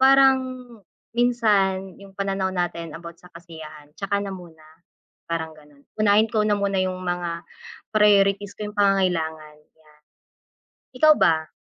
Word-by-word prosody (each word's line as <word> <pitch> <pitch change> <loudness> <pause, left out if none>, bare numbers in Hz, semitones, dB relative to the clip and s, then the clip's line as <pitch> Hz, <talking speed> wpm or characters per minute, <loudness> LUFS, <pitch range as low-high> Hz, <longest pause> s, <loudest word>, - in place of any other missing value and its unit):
parang 270 0 +6 0.8
minsan 200 -6 +1
yung 195 -1 -13
pananaw 195 -1 -1
natin 170 -3 -3
about 170 0 -10
sa 180 - -16
kasiyahan 155 -3 -12
tsaka 200 0 -2
na 195 - -5
muna. 165 -4 -13 0.6
parang 165 -1 -3
ganon, 145 -1 -20 0.2
unahin 215 +1 +4
ko 215 -2 +1
na 210 - +3
muna 200 -1 0
yung 185 0 -3
mga 175 -1 -3 0.5
priorities 205 -1 +3
ko 210 0 -6
yung 205 - -15
pangangailangan 165 -6 0
yan. 150 0 -27 1.0
Ikaw 310 +3 +7
ba? 160 -1 +2
190 Hz, 135 wpm, -23 LUFS, 165-205 Hz, 1.0 s, Ikaw